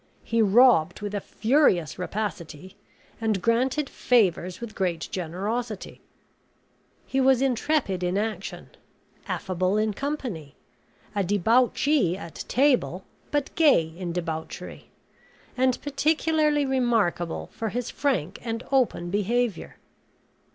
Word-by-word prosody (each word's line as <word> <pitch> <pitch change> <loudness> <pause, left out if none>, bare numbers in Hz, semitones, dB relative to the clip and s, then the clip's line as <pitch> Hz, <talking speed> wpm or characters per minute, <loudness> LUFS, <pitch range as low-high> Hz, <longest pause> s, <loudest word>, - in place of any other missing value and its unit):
He 230 0 +1
robbed 210 -5 +5
with 205 0 -4
a 205 - -2
furious 215 - +2
rapacity, 185 -3 -5 0.5
and 220 -3 +1
granted 255 +7 +1
favors 185 -9 +1
with 235 -2 -7
great 175 -4 -2
generosity; 200 +6 -4 1.0
he 270 - 0
was 265 -1 +4
intrepid 260 -6 0
in 180 +1 0
action; 210 -2 -4 0.6
affable 185 +2 -1
in 215 0 +1
company; 230 - -5 0.6
a 200 -1 0
debauchee 225 - +2
at 170 -4 -8
table, 250 - +2 0.3
but 290 -2 -1
gay 220 - +4
in 175 -1 -4
debauchery; 165 -2 -5 0.7
and 255 0 +2
particularly 300 +1 +1
remarkable 230 -10 0
for 225 - -3
his 245 +2 -3
frank 200 - -1
and 230 0 -3
open 245 -10 +1
behavior. 210 0 -1
220 Hz, 110 wpm, -25 LUFS, 180-260 Hz, 1.0 s, robbed